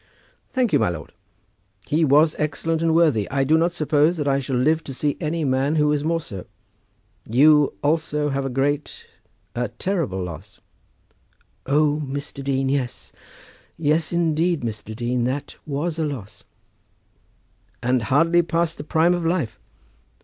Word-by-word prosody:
"Thank 255 -4 0
you, - - +5
my - - +2
lord. 80 -3 -7 0.7
He 160 +3 +1
was 150 +2 +4
excellent 160 +2 -1
and 165 -1 +2
worthy. 150 -12 +3
I 135 0 +1
do 150 +4 +3
not 165 +2 +2
suppose 155 0 +2
that 145 -2 -2
I 135 0 +2
shall 135 -1 -3
live 155 +6 +2
to 135 - -7
see 145 +2 0
any 160 0 -1
man 135 +3 +1
who 150 -1 +3
was 150 -1 +1
more 165 +1 +1
so. 100 - -9 0.8
You 145 +4 +5
also 150 -1 0
have 135 0 -1
a 135 - -2
great, 140 +3 -2 0.5
a 120 0 -1
terrible 120 - -2
loss." 90 +3 -9 1.1
"O, 150 +2 +2
Mr. 140 0 -6
Dean, 135 -1 0
yes; 135 -2 -2 0.7
yes, 155 0 +1
indeed, 170 -1 +1
Mr. 110 -2 -5
Dean. 120 +1 -1
That 135 +3 -3
was 155 +3 -2
a - - +1
loss." 125 -9 -6 1.4
"And 125 0 +2
hardly 165 +9 +3
past 170 0 -1
the - - -4
prime 160 +3 +3
of 175 -1 -2
life!" 165 -9 -1
145 Hz, 155 wpm, -22 LUFS, 130-160 Hz, 1.4 s, you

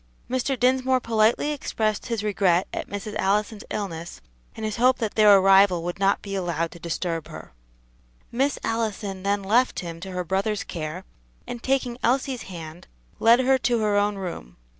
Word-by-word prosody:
Mr. 255 +1 -1
Dinsmore 255 +1 +3
politely 230 +5 +2
expressed 220 -7 -2
his 230 -4 -2
regret 190 -3 +2
at - - -4
Mrs. 205 +1 -5
Allison's 210 +2 0
illness, 170 - -5 0.4
and 220 - -5
his 215 -1 -3
hope 255 +2 +4
that 220 -4 -2
their 210 -2 +7
arrival 195 -2 +5
would 175 +2 -4
not 195 0 +2
be 200 - -6
allowed 170 -3 -2
to 170 - -12
disturb 165 -1 -3
her. 80 -6 -11 0.8
Miss 270 +4 0
Allison 215 -4 -2
then 200 +1 0
left 220 -1 +2
him 165 -2 -7
to 190 +3 -7
her 180 -1 -3
brother's 195 +4 -1
care, 155 -3 -6 0.4
and 240 - -7
taking 255 -2 -1
Elsie's 255 0 0
hand, 165 -2 -9 0.3
led 235 +2 +6
her 265 +1 +3
to 245 -1 +1
her 210 -1 +1
own 205 0 +2
room. 175 - -7
205 Hz, 170 wpm, -24 LUFS, 180-235 Hz, 0.8 s, their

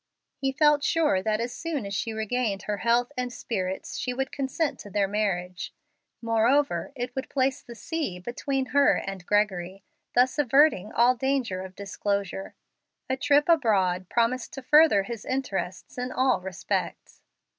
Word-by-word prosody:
He 270 -1 -1
felt 295 +1 +3
sure 305 - +2
that 215 +2 0
as 235 +1 -3
soon 315 -9 -3
as 200 - -5
she 225 +3 -2
regained 220 -2 -2
her 210 -1 -2
health 240 +4 +1
and 250 -1 -2
spirits 190 -6 -4
she 250 -1 -2
would 270 0 -2
consent 275 +3 -2
to 205 - -9
their 200 0 +1
marriage; 190 -3 -2 0.5
moreover, 235 +7 +2
it 245 -1 -4
would 265 - -4
place 265 -1 0
the 235 - -11
sea 295 - -3
between 260 +6 -3
her 285 0 +5
and 195 -2 -5
Gregory, 195 -2 0 0.3
thus 255 +4 +3
averting 270 -6 +4
all 240 +2 +4
danger 255 -7 -1
of 190 0 -9
disclosure. 200 -1 -3 0.6
A - - +2
trip 290 +2 +3
abroad 195 - +2
promised 235 +1 0
to 270 - -7
further 300 -8 +6
his 230 +1 -6
interests 250 -6 -4
in 250 +1 -3
all 255 -5 +2
respects. 185 -1 -4
235 Hz, 155 wpm, -26 LUFS, 200-270 Hz, 0.6 s, further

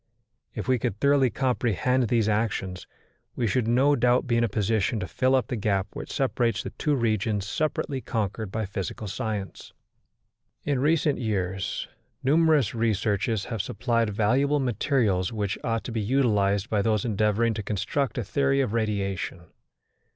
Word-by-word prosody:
If - - -4
we 130 -1 +2
could 105 -1 -2
thoroughly 140 -2 +4
comprehend 125 0 +1
these 115 -1 +2
actions, 105 -4 -1 0.5
we 120 - 0
should 115 +1 +1
no 135 +5 +4
doubt 125 0 +2
be 120 -3 0
in 115 - +3
a 115 - +1
position 110 +3 0
to 95 - -4
fill 130 +1 +2
up 130 -4 +2
the 125 - -3
gap 100 -3 0
which - - -7
separates 120 -3 0
the - - -6
two 150 -1 0
regions 110 -4 0
separately 145 +3 -2
conquered 110 -3 -3
by 110 +1 -2
physical 100 +2 -5
science. 105 -2 -5 0.9
In 140 -3 0
recent 150 0 +2
years 95 -5 -2 0.4
numerous 150 -4 +3
researches 110 -2 0
have 115 -5 -2
supplied 115 +2 0
valuable 130 +8 +2
materials 115 - +1
which 105 -3 -2
ought 115 -1 -1
to - - -6
be 115 -1 -1
utilized 105 -4 +2
by 105 -4 +1
those 110 0 +1
endeavouring 110 +1 +1
to 110 - -4
construct 110 +5 -2
a 120 - 0
theory 140 +5 +1
of 130 -6 0
radiation. 100 -5 -2
115 Hz, 160 wpm, -26 LUFS, 105-130 Hz, 0.9 s, thoroughly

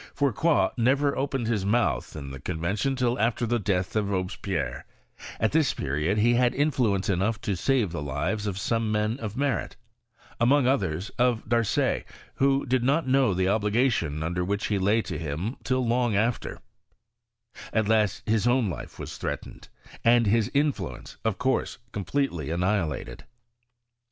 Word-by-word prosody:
Fourcroy 145 +4 +2
never 135 +4 +2
opened 135 -2 -1
his 110 -4 0
mouth 100 - 0
in 70 -3 -6
the 70 - -8
Con 85 +6 -4
vention 105 +11 -1
till 125 -2 0
after 115 +2 +1
the 120 +1 0
death 90 -2 -1
of 105 -2 +1
Robespierre; 95 -7 -2 0.6
at 110 - +2
this 155 -3 +2
period 75 +8 -1
he 115 +3 +4
had 125 +1 +2
influence 125 -9 +1
enough 100 +3 0
to 100 - -1
save 115 +1 +1
the 85 -3 -4
lives 75 +10 -2
of 95 -2 -3
some 115 +1 0
men 105 +3 0
of 110 -1 -5
merit: 140 -1 -1 0.6
among 130 +3 +4
others, 95 - 0
of 120 -3 +2
Darcet, 115 -2 +1 0.3
who 135 0 +2
did 130 -2 +1
not 140 +4 +2
know 130 -6 +3
the 95 0 +1
obligation 105 - +1
under 90 +2 -1
which 100 +3 -2
he 105 -2 +1
lay 105 +4 +2
to 85 -6 -5
bim 80 - -3
till 130 0 0
long 120 -2 +1
after; 115 +4 0 1.1
at 110 -2 +1
last 110 -3 +1
his 110 +1 +2
own 120 -5 +2
life - - -8
was - - -7
threat - - -3
ened, - - -13 0.4
and 120 0 +5
his 110 0 +2
influence, 145 0 -1
of 110 -4 0
course, 130 -1 0
completely 100 - -2
anni 85 +2 -1
bilated. 90 -9 -1
110 Hz, 165 wpm, -26 LUFS, 95-125 Hz, 1.1 s, and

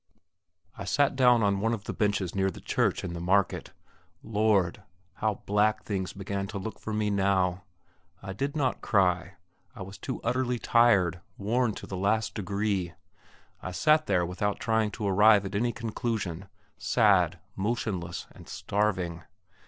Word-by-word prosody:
I - - -4
sat 140 +8 +2
down 125 -3 +5
on 100 -1 +2
one 115 +3 +1
of 105 - -11
the - - -5
benches 100 -4 0
near 95 0 +1
the 95 - -9
church - - 0
in 85 - -4
the 85 - -5
market. 95 +3 +1 0.5
Lord! 105 -4 +1 0.4
how 105 -2 -1
black 105 +1 +2
things 95 -3 -3
began 100 0 -4
to 100 - -6
look 105 +3 -6
for 110 - -6
me 105 -1 0
now! 95 -2 +1 0.5
I 95 -1 -7
did 140 +8 -3
not 135 -4 0
cry; 90 -2 +1 0.4
I - - -6
was 95 +1 -10
too 130 - -4
utterly 125 +1 0
tired, 100 -9 +3 0.2
worn 115 +2 0
to - - -8
the 95 - -6
last 105 +4 0
degree. 100 -3 -2 0.7
I - - -5
sat 155 - +3
there 90 -3 +2
without 95 +4 -2
trying 110 -2 +1
to 105 -1 -4
arrive 105 +1 +5
at 95 - -5
any 120 +4 +1
conclusion, 110 -6 -3 0.3
sad, - - +3 0.2
motionless, 100 -4 -3
and - - -15
starving. 95 -5 -1
100 Hz, 160 wpm, -28 LUFS, 95-110 Hz, 0.7 s, down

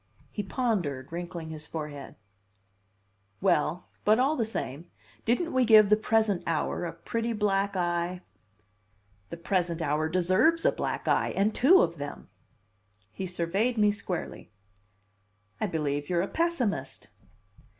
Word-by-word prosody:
He 210 - -3
pondered, 185 - -2
wrinkling 170 -1 -6
his 155 -1 -8
forehead. 150 -3 -7 1.2
"Well, 160 +8 +1 0.2
but 215 +1 +4
all 270 +5 +2
the 240 - 0
same, 165 - -5 0.4
didn't 245 +9 0
we 260 0 +3
give 215 -3 +7
the 210 - +7
present 220 -3 +1
hour 165 +1 -1
a 170 - -3
pretty 230 +7 -3
black 200 -2 0
eye?" 175 0 -1 1.1
"The - - -6
present 170 -1 -1
hour 155 0 0
deserves 185 - +2
a - - +5
black - - -4
eye, - - +2
and 205 +2 +2
two 325 +10 +6
of 170 0 -2
them!" 145 0 -7 0.8
He 190 - -5
surveyed 190 +7 -1
me 210 -1 +4
squarely. 185 -4 -5 1.1
"I 215 - 0
believe 145 -4 -2
you're 175 -1 +1
a - - -2
pessimist!" 330 -10 -2
185 Hz, 135 wpm, -28 LUFS, 165-220 Hz, 1.2 s, give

